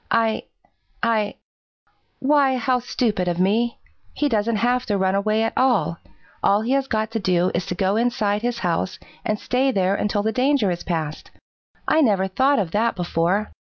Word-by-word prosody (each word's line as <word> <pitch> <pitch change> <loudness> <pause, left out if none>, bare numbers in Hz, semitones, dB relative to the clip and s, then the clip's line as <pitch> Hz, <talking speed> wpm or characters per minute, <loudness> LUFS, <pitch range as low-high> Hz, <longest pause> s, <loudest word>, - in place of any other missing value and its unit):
I 225 -1 +1 0.6
I 215 -3 +1 0.8
why, 270 -1 +3
how 250 +1 +1
stupid 220 -6 -1
of 175 -1 0
me! 220 +6 +1 0.4
He 295 - +1
doesn't 225 -1 +1
have 245 +3 +1
to 205 -2 +1
run 190 0 +1
away 215 +2 +1
at 225 - -1
all! 195 - +2 0.4
All 205 +1 +3
he 235 +3 -2
has 275 0 +1
got 220 -2 -1
to 225 - -2
do 180 -2 +1
is 175 0 -2
to 180 - -3
go 195 +2 +1
inside 225 -4 0
his 240 0 -1
house 175 +2 -1 0.3
and 215 -2 -1
stay 260 +2 +1
there 190 -4 +1
until 205 0 -1
the 220 - +1
danger 255 -3 +2
is 175 - -4
past! 160 -4 -4 0.6
I 315 - +4
never 200 -8 +2
thought 265 +9 +2
of 180 -5 -1
that 225 +5 +1
before. 180 +3 0
215 Hz, 180 wpm, -22 LUFS, 190-245 Hz, 0.8 s, I